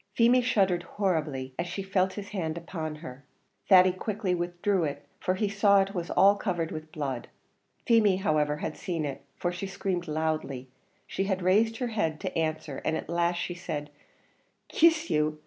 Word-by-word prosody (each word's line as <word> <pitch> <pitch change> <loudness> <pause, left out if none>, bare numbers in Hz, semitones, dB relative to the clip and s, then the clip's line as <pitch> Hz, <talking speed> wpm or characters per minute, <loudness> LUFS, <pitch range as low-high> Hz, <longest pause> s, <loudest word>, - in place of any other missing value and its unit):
Feemy 245 +2 +5
shuddered 195 -8 +2
horribly 155 -9 -2
as 170 - -1
she 195 - -4
felt 190 -1 +1
his 205 -1 -7
hand 165 -5 -3
upon 165 -2 -5
her. 130 +2 -9 0.5
Thady 185 -1 +8
quickly 195 0 -2
withdrew 175 +2 0
it, 145 -2 -4
for 185 - 0
he 210 +2 0
saw 200 0 +4
it 195 0 0
was 175 -3 -3
all 200 +2 +5
covered 175 -6 -2
with 155 0 -7
blood; 135 -5 -4 0.6
Feemy, 220 -5 +5
however, 155 -6 +1
had 155 0 -4
seen 165 0 -3
it, 140 -1 -5 0.2
for 175 - -1
she 180 +2 -5
screamed 185 -2 -3
loudly 155 -4 -2 0.4
she 195 - -2
had 190 -2 -1
raised 220 +5 +3
her 245 0 -2
head 165 -9 -1
to 185 -1 -4
answer, 155 -3 -2
and 160 - 0
at - - -7
last 170 +1 +1
she 175 - -3
said 150 -4 -5 0.8
"Kiss 325 0 +3
you! 150 0 +1
175 Hz, 180 wpm, -28 LUFS, 155-195 Hz, 0.8 s, Thady